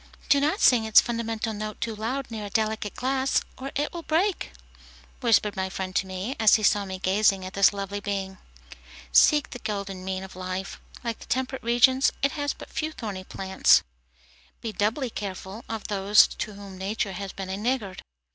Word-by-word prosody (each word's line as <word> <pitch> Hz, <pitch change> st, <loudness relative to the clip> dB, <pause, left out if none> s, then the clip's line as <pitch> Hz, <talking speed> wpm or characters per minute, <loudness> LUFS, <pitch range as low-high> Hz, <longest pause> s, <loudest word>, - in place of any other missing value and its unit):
"Do 285 Hz, -2 st, +6 dB
not 310 Hz, +8 st, +1 dB
sing 245 Hz, -3 st, +6 dB
its 220 Hz, -, +8 dB
fundamental 225 Hz, -1 st, -2 dB
note 215 Hz, 0 st, -5 dB
too 225 Hz, -2 st, -3 dB
loud 240 Hz, +5 st, -3 dB
near 215 Hz, -2 st, -5 dB
a -, -, -6 dB
delicate 215 Hz, 0 st, -1 dB
glass, 265 Hz, +1 st, +1 dB
or 270 Hz, +1 st, -6 dB
it 295 Hz, +4 st, -1 dB
will 340 Hz, -, -5 dB
break," 345 Hz, +5 st, 0 dB, 0.7 s
whispered 220 Hz, -4 st, +3 dB
my 190 Hz, -1 st, -2 dB
friend 185 Hz, 0 st, -5 dB
to 190 Hz, -, +1 dB
me, 190 Hz, +8 st, -4 dB
as 220 Hz, -2 st, +6 dB
he 215 Hz, -, 0 dB
saw 205 Hz, 0 st, +3 dB
me 190 Hz, -1 st, -5 dB
gazing 195 Hz, 0 st, +2 dB
at 185 Hz, -, -7 dB
this 200 Hz, 0 st, +5 dB
lovely 200 Hz, 0 st, -4 dB
being. 195 Hz, -1 st, -4 dB, 0.7 s
Seek 300 Hz, -2 st, +5 dB
the 245 Hz, -, -7 dB
golden 200 Hz, -4 st, -4 dB
mean 190 Hz, 0 st, -3 dB
of 190 Hz, -, -10 dB
life. 185 Hz, +1 st, -5 dB, 0.2 s
Like 230 Hz, -2 st, -3 dB
the -, -, -12 dB
temperate 260 Hz, +1 st, -2 dB
regions, 245 Hz, +3 st, +4 dB
it 280 Hz, -, +3 dB
has 290 Hz, -1 st, -2 dB
but -, -, -11 dB
few 310 Hz, 0 st, -2 dB
thorny 200 Hz, -8 st, -6 dB
plants. 190 Hz, 0 st, +3 dB, 0.8 s
Be 225 Hz, -, -4 dB
doubly 225 Hz, +5 st, -1 dB
careful 195 Hz, +1 st, -6 dB
of 225 Hz, -2 st, -4 dB
those 205 Hz, +1 st, +5 dB
to 215 Hz, -, -5 dB
whom 195 Hz, -2 st, -10 dB
nature 200 Hz, +1 st, -2 dB
has 195 Hz, +1 st, -5 dB
been 190 Hz, -1 st, -6 dB
a -, -, -2 dB
niggard. 215 Hz, -4 st, -2 dB
215 Hz, 190 wpm, -26 LUFS, 195-245 Hz, 0.8 s, its